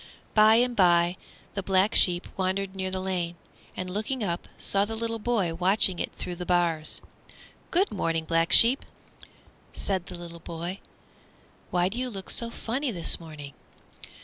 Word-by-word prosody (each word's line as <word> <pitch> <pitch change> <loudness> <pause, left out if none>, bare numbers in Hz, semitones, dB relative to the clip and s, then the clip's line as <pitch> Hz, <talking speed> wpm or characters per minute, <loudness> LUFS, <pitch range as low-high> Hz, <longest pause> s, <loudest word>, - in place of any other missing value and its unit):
By 215 +1 +5
and 245 +1 0
by 175 -3 +2 0.4
the 200 - -4
Black 195 +2 0
Sheep 175 -1 +6
wandered 190 +1 -3
near 190 0 -3
the 185 0 -4
lane, 180 -2 -4 0.4
and 185 - -5
looking 215 +6 -4
up, 175 -3 -5
saw 200 0 0
the 225 +2 -5
little 230 0 -4
boy 210 -7 -1
watching 185 +1 +2
it - - -4
through 175 -1 -7
the 180 - -6
bars. 170 -3 +1 0.7
"Good 380 +3 0
morning, 165 -4 -3
Black 165 0 -1
Sheep," 245 +4 +8 0.9
said 190 -3 -1
the 170 -1 -10
boy; 170 +3 -7 0.9
"why 180 0 0
do 220 +6 -5
you 255 0 -3
look 195 -4 -7
so 235 - -1
funny 255 +5 -4
this 175 -7 +6
morning?" 150 -4 -11
185 Hz, 155 wpm, -25 LUFS, 175-215 Hz, 0.9 s, Sheep